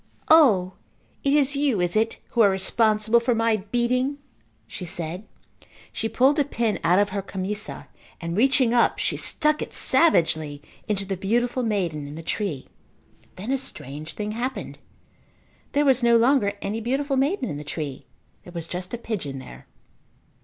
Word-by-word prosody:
"O, 210 - +6 0.5
it 275 - +2
is 285 -1 +3
you, 280 -7 +1
is 175 +1 0
it, 225 +1 +1
who 235 - +2
are 205 - +7
responsible 215 +3 +2
for 235 +1 +1
my 225 -1 +2
beating?" 245 +6 0 0.5
she - - -8
said. 175 +2 -5 0.7
She 225 - -2
pulled 265 +7 +3
a - - +5
pin 235 -6 -1
out 180 +2 +4
of 205 0 +3
her 200 0 -3
camisa 195 +2 -5 0.3
and, 170 0 -4
reaching 255 +1 +3
up, 240 - +3
she - - 0
stuck 305 -1 0
it - - -5
savagely 160 - +3 0.3
into 200 -2 -1
the 195 0 -2
beautiful 240 +7 0
maiden 180 -10 -1
in 145 - -8
the 165 - -8
tree. 160 -6 -3 0.7
Then 205 +7 -5
a 270 - +1
strange 150 - -7
thing 210 0 -4
happened. 250 +4 -4 0.9
There 290 +1 +3
was 265 -2 +4
no 235 -1 +5
longer 230 -4 +3
any 215 +3 -3
beautiful 275 +4 -1
maiden 275 +2 +1
in 145 - -4
the 150 - -7
tree. 145 -2 -6 0.4
There 175 - -13
was 165 -2 -5
just 180 +5 -4
a - - -6
pigeon 190 -13 -4
there. 130 - -11
215 Hz, 165 wpm, -24 LUFS, 180-250 Hz, 0.9 s, are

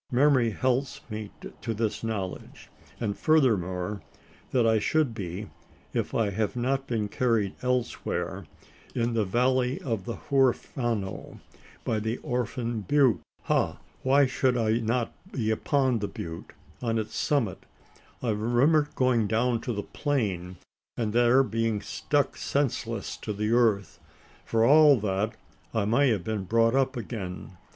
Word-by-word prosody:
Memory 130 -2 +4
helps 130 +5 0
me 105 -1 -5 0.3
to 115 -2 -3
this 110 0 -2
knowledge; 100 -5 -5 0.3
and 105 -4 -1
furthermore, 105 - +1 0.5
that 125 -3 +2
I 110 -1 +4
should 150 +3 +1
be, 100 -1 -6 0.4
if - - -2
I 110 -3 +2
have 105 +1 -1
not 135 +2 -1
been 110 -4 -1
carried 110 -3 +1
elsewhere, 125 -1 -2 0.5
in 120 -1 0
the 110 -2 +1
valley 125 +5 +1
of 115 -8 -3
the 115 - -4
Huerfano 120 -6 -1 0.4
by 110 - 0
the 110 +2 -2
Orphan 120 -2 -2
Butte. 130 +3 +3 0.2
Ha! - - +1 0.2
why 140 +2 +4
should 130 -1 +1
I 115 0 +2
not 115 +1 -1 0.2
be 110 -4 -1
upon 130 +1 +1
the 105 - -2
butte 85 -3 -7 0.3
on 115 -2 0
its 110 0 -3
summit? 125 - 0 0.6
I 120 - +1
remember 125 +8 +3
going 125 -4 +2
down 115 +2 +1
to 125 - -3
the 105 -3 -3
plain; 95 - -2 0.4
and 110 -3 -1
there 120 +3 +5
being 115 -3 0
struck 145 +7 -1
senseless 115 -6 -1
to 105 - -4
the 105 +2 -1
earth. 110 -6 +2 0.5
For 115 0 +2
all 145 0 +7
that, 105 +1 -1 0.4
I 110 -2 +2
may 130 +6 +3
have 110 -4 0
been 110 -3 -3
brought 115 +3 +3
up 135 0 +1
again. 95 -5 -6
115 Hz, 145 wpm, -27 LUFS, 105-130 Hz, 0.6 s, all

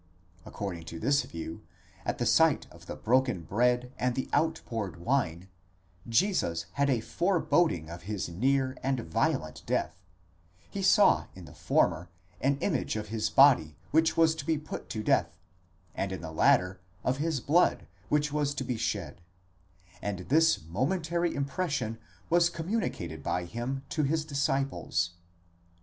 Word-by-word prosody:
According 90 -5 -5
to 80 0 -7
this 140 - +3
view, 80 0 -7 0.4
at - - -1
the - - -1
sight - - +4
of - - -16
the - - -5
broken 125 -6 +1
bread 125 +6 +1
and 125 -1 0
the 130 - -2
outpoured 115 - -1
wine, 95 -5 -1 0.6
Jesus 115 - +1
had 140 0 +1
a 125 -4 +2
fore 180 - 0
boding 125 - +2
of 85 +2 -8
his 100 +1 -4
near 130 +9 +1
and 135 -2 0
violent 80 - -1
death; 95 - -1 0.7
he 200 - -5
saw 195 +2 +5
in 95 -2 -10
the 75 - -13
former 85 0 +1 0.3
an 135 +1 +1
image - - 0
of 105 -1 -4
his 110 0 -1
body 105 - +5 0.2
which 160 +1 +3
was 165 -1 +5
to 160 -3 -6
be 160 +1 +1
put 150 0 -7
to 110 - -4
death, 85 - +1 0.6
and 95 - -2
in 95 - -5
the 80 -1 -6
latter 90 +3 +3 0.2
of 130 +1 0
his 155 -1 -1
blood 160 +8 +2 0.2
which 150 0 +1
was 145 -1 0
to 135 - -2
be 125 -2 -2
shed; 90 -8 -3 0.8
and 100 -3 -4
this 160 - +4
momentary 165 - 0
impression 140 -5 -2 0.3
was 170 0 +4
communicated 165 - -3
by 90 +5 -1
him 120 +8 -4
to 155 - -1
his 155 +2 0
disciples. 135 - -1
130 Hz, 155 wpm, -29 LUFS, 90-150 Hz, 0.8 s, saw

